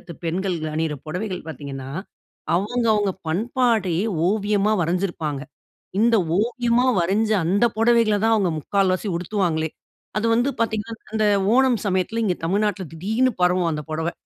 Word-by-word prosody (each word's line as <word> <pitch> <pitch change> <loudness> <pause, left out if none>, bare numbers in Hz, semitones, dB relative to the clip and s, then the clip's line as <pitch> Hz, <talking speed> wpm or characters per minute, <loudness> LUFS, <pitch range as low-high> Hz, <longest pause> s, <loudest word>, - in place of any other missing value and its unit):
மாநிலத்து 170 - -10
பெண்கள் 180 +2 -1 0.2
அணியுற 160 -1 -1
பொடவைகள் 180 +2 -4
பாத்தீங்கன்னா, 135 -2 -7 0.7
அவங்க 230 +6 0
அவங்க 205 -2 +1 0.2
பண்பாடயே 215 -2 +1 0.2
ஓவியமா 210 0 +1
வரைஞ்சிருப்பாங்க. 165 -5 -2 0.6
இந்த 230 0 +4 0.2
ஓவியமா 240 +2 +1
வரைஞ்ச 205 +6 +1
அந்த 195 +7 +2
பொடவைகள 230 -2 +4
தான் 225 0 +4
அவங்க 195 -4 +1
முக்கால்வாசி 195 +4 0
உடுத்துவாங்களே. 170 -4 -1 0.5
அது 225 - 0
வந்து 245 +4 +2
பாத்தீங்கன்னா, 225 0 -1 0.2
அந்த 215 -1 +2 0.3
ஓணம் 255 -5 +3
சமயத்துல 195 +4 0
இங்க 180 -4 0
தமிழ்நாட்டில 200 -1 0
திடீர்னு 220 +9 +1
பரவும் 180 -1 +3
அந்த 150 -1 -4
புடவை. 160 +2 -2
200 Hz, 130 wpm, -22 LUFS, 170-225 Hz, 0.7 s, இந்த